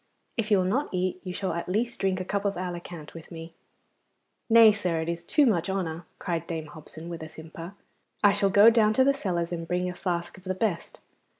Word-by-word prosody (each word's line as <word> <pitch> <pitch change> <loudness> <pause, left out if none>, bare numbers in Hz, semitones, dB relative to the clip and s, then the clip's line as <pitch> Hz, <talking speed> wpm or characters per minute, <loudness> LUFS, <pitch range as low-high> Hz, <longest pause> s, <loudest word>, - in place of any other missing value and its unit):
If 230 -2 -2
you 205 - +5
will 185 - +1
not 250 +11 0
eat, 185 0 -1
you 185 - -5
shall 190 +1 -2
at 170 +1 -4
least 230 +5 -1
drink 190 -1 0
a 185 - -4
cup 200 +2 -2
of 200 -1 0
Alicant 175 -3 -6
with 165 -1 -11
me.' 165 0 -9 1.0
'Nay, 225 -1 +8
sir, 180 -5 -1
it 160 - -4
is 170 0 -3
too 295 - +3
much 180 -7 +1
honour,' 175 -3 -3
cried 170 -3 -3
Dame 160 -2 -4
Hobson, 155 +2 -11
with 170 -1 -6
a 160 - -7
simper. 165 +4 -10 0.5
'I 205 - +7
shall 200 -1 +2
go 205 +4 +7
down 225 -2 +4
into 215 +5 +4
the 275 +1 +4
cellars 175 -9 -2
and 165 -1 -4
bring 180 +1 0
a - - -8
flask 175 -1 -3
of - - -21
the 185 0 -2
best. 185 -4 -2
180 Hz, 225 wpm, -27 LUFS, 170-205 Hz, 1.0 s, Nay